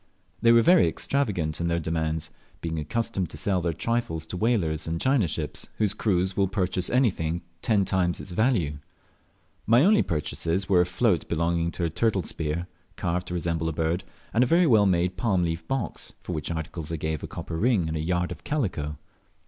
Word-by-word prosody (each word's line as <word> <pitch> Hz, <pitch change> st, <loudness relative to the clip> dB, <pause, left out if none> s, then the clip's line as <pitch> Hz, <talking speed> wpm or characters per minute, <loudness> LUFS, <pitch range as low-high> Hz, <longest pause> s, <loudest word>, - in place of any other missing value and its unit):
They 115 Hz, -, +6 dB
were 115 Hz, 0 st, +6 dB
very 175 Hz, +4 st, +6 dB
extravagant 95 Hz, -, -1 dB
in 85 Hz, -, 0 dB
their 85 Hz, 0 st, +1 dB
demands, 80 Hz, -1 st, -2 dB, 0.3 s
being 80 Hz, -1 st, -3 dB
accustomed 95 Hz, +2 st, -2 dB
to -, -, -8 dB
sell 95 Hz, +3 st, 0 dB
their 85 Hz, 0 st, 0 dB
trifles 115 Hz, -3 st, -2 dB
to 85 Hz, -, -6 dB
whalers 90 Hz, -8 st, 0 dB
and 85 Hz, 0 st, -2 dB
China 130 Hz, -5 st, +2 dB
ships, 75 Hz, 0 st, -3 dB
whose 105 Hz, -3 st, +1 dB
crews 95 Hz, -3 st, 0 dB
will 100 Hz, -1 st, +2 dB
purchase 90 Hz, -2 st, -1 dB
anything 100 Hz, -11 st, +1 dB
at 85 Hz, 0 st, -12 dB
ten 105 Hz, -4 st, +2 dB
times 90 Hz, -2 st, +1 dB
its 95 Hz, -, -6 dB
value. 90 Hz, -, +1 dB, 0.9 s
My 120 Hz, +7 st, +6 dB
only 210 Hz, +1 st, +5 dB
purchases 85 Hz, +3 st, -1 dB
were 90 Hz, -3 st, +5 dB
a 90 Hz, -, +1 dB
float 90 Hz, 0 st, +1 dB
belonging 85 Hz, 0 st, +1 dB
to 90 Hz, -, -3 dB
a 85 Hz, -, +1 dB
turtle 100 Hz, 0 st, +1 dB
spear, 80 Hz, +2 st, -3 dB, 0.3 s
carved 90 Hz, +1 st, -2 dB
to 90 Hz, -, -4 dB
resemble 85 Hz, -1 st, -1 dB
a -, -, -3 dB
bird, 80 Hz, +4 st, -1 dB, 0.3 s
and 115 Hz, -, +4 dB
a -, -, +1 dB
very 170 Hz, +6 st, +4 dB
well 110 Hz, -8 st, +5 dB
made 90 Hz, 0 st, +1 dB
palm 100 Hz, -7 st, +1 dB
leaf 80 Hz, -1 st, -3 dB
box, 130 Hz, -10 st, -3 dB
for 90 Hz, -, -4 dB
which 75 Hz, -3 st, -3 dB
articles 80 Hz, -1 st, -4 dB
I -, -, -1 dB
gave 80 Hz, -1 st, -3 dB
a -, -, -5 dB
copper 85 Hz, -, -6 dB
ring 105 Hz, -4 st, +2 dB
and 80 Hz, -, -3 dB
a -, -, -1 dB
yard 90 Hz, +2 st, 0 dB
of -, -, -8 dB
calico. 90 Hz, -, -2 dB
90 Hz, 200 wpm, -26 LUFS, 80-110 Hz, 0.9 s, They